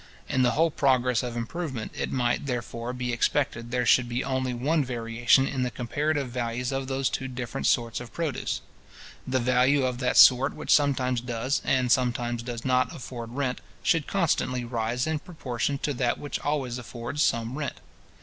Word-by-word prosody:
In 130 - +1
the 125 -1 +3
whole 165 +1 +4
progress 130 -4 +2
of 120 -1 -4
improvement, 130 0 -4
it - - -3
might, 125 +1 0
therefore, 120 -1 -3
be 125 -1 -3
expected 120 -1 0
there 125 0 0
should 120 +1 +4
be 120 +3 -1
only 130 -1 -1
one 145 +6 +1
variation 120 +1 +2
in 135 - -2
the 125 - +1
comparative 140 +3 -1
values 120 +1 -2
of 135 -1 -2
those 135 0 0
two 135 - -2
different 125 +1 -3
sorts 115 -2 +1
of 120 -2 -9
produce. 160 -5 -2 0.7
The 130 0 +1
value 130 +2 +3
of 125 -1 -2
that 125 -1 +1
sort 130 +2 +7
which - - +1
sometimes 130 -4 +2
does, 125 +3 -1
and 130 -2 +1
sometimes 120 -2 +1
does 120 -1 -6
not 130 0 +2
afford 120 -2 -7
rent, 135 -3 -1 0.2
should 165 -4 +2
constantly 130 -9 0
rise 120 +1 -1
in 155 -1 -1
proportion 140 -5 -3
to 145 - 0
that 120 -2 0
which 145 - -4
always 135 -4 -2
affords 120 +4 -5
some 115 -2 +1
rent. 150 0 -4
125 Hz, 180 wpm, -27 LUFS, 120-135 Hz, 0.7 s, sort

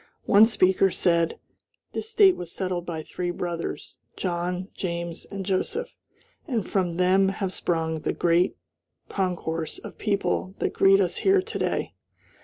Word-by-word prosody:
One 210 +2 +7
speaker 190 -3 +3
said: 170 -2 +1 0.6
"This 440 - -4
State 405 -4 +6
was 175 -1 -7
settled 180 -2 -3
by 160 -2 -4
three 175 +3 -4
brothers, 175 -1 -4 0.2
John, 180 +1 -2
James, 170 -2 -4
and 195 -1 -6
Joseph, 200 - -1 0.6
and 235 -8 -1
from 180 -4 0
them 190 +1 +4
have 195 -1 -3
sprung 160 -3 -1
the - - -1
great 175 +1 +2 0.5
concourse 165 -4 -2
of - - -11
people 200 -2 -1
that - - -1
greet 195 0 +5
us 180 -3 +1
here 390 0 +4
to 370 - -4
day." - - -1
185 Hz, 145 wpm, -25 LUFS, 170-195 Hz, 0.6 s, One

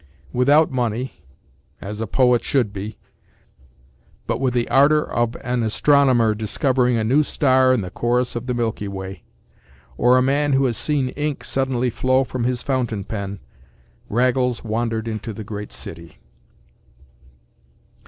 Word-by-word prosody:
Without 145 +6 +4
money—as 105 - -6
a 115 - -2
poet 125 +2 +3
should 120 -7 0
be—but 65 - -10
with 130 -2 0
the 120 -1 +1
ardor 150 +3 +4
of 120 0 -1
an 125 0 -1
astronomer 120 0 +3
discovering 125 +4 0
a 110 - 0
new 130 +7 +3
star 130 -3 +3
in 125 -4 +2
the 90 -2 -6
chorus 120 +1 0
of 120 +2 -5
the 125 - -1
milky 115 -3 -2
way, 95 -2 -7 0.8
or 125 +1 +4
a - - +4
man 145 +2 +1
who 135 0 +3
has 120 -3 0
seen 140 -2 0
ink 150 +1 -3
suddenly 130 -2 0
flow 130 +3 +2
from 125 -2 -4
his 125 -1 -1
fountain 125 -7 -1
pen, 100 -2 -5 0.7
Raggles 125 +1 +1
wandered 115 0 -2
into 110 0 -4
the 110 - -7
great 105 0 -7
city. 85 -1 -9
120 Hz, 140 wpm, -21 LUFS, 110-130 Hz, 0.8 s, Without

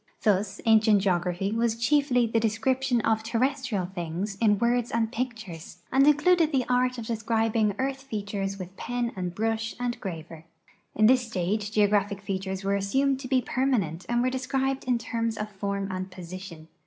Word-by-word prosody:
Thus 200 -1 +1
ancient 215 -3 +5
geography 180 +1 0
was 230 0 +1
chiefly 250 0 +3
the 225 0 +1
description 240 +3 +1
of 220 0 +1
terrestrial 245 -2 -1
things 180 +2 -4
in 210 -2 +4
words 240 +2 +1
and 225 -1 0
pictures, 210 -9 -6
and 275 +2 +5
included 315 +2 +4
the 260 -4 +1
art 250 0 +1
of 230 - -5
descrilfing 225 -2 0
earth 270 0 -2
features 200 -5 -4
with 185 0 -8
pen 245 -1 -2
and 180 -2 -3
l)rush 225 0 -1
and 245 -1 -2
graver. 165 -3 -7 0.5
In 215 - +4
this 250 +1 +4
stage 205 +1 -1
geograj)hic 205 -1 +2
features 190 -1 -4
were 200 +1 +1
assumed 265 +8 +1
to 265 - -6
be 255 -1 +2
j)ermanent 215 - -1
and 240 0 +2
were 255 - +1
described 265 +1 -1
in 250 -1 +2
terms 230 -1 -2
of 210 0 -4
form 200 0 -3
and 185 0 -4
position. 180 -2 -9
220 Hz, 165 wpm, -27 LUFS, 195-250 Hz, 0.5 s, ancient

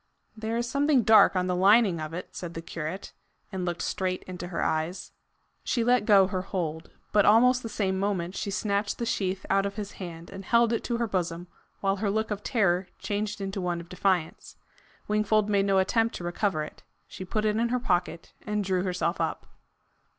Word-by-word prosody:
"There 220 +1 -3
is 240 0 -1
something 280 -1 +2
dark 220 -2 +6
on 180 0 +1
the 180 0 0
lining 195 -2 +4
of 155 0 -5
it," 175 +2 -6
said 170 -2 -6
the 165 - -4
curate, 165 +3 -6 0.4
and 185 -2 -3
looked 175 -1 -2
straight 185 -1 -2
into 180 -1 -7
her 175 - -2
eyes. 160 +4 -2 0.5
She 235 - 0
let 245 -2 +2
go 200 -2 +7
her 185 -1 -2
hold. 165 -4 -4 0.2
But 205 -1 +4
almost 250 +4 +5
the 225 - -6
same 190 -3 -1
moment 190 -2 -1
she - - -3
snatched 200 0 -1
the 235 - -2
sheath 190 -3 -2
out 195 0 +2
of 200 - -7
his 205 -1 -5
hand 170 -3 -9
and 195 0 -8
held 235 +3 +3
it 230 - -1
to 235 - -1
her 235 - 0
bosom, 175 -4 -2 0.4
while 195 0 +1
her 205 +1 -1
look 220 +2 -1
of 205 0 -2
terror 195 -6 +1
changed 210 +1 -3
into 195 0 -3
one 175 -1 -1
of 170 0 -11
defiance. 180 -3 -1 0.5
Wingfold 215 0 +2
made 200 -1 +2
no 195 -1 +3
attempt 225 +4 +2
to - - -6
recover 175 -2 -1
it. 150 - -10 0.3
She - - -8
put 215 +3 -2
it 210 0 +1
in 235 +1 +1
her 250 +1 +1
pocket, 175 -6 -1
and 210 -1 -1
drew 185 -1 0
herself 180 -2 -1
up. - - -2
195 Hz, 205 wpm, -27 LUFS, 180-215 Hz, 0.5 s, go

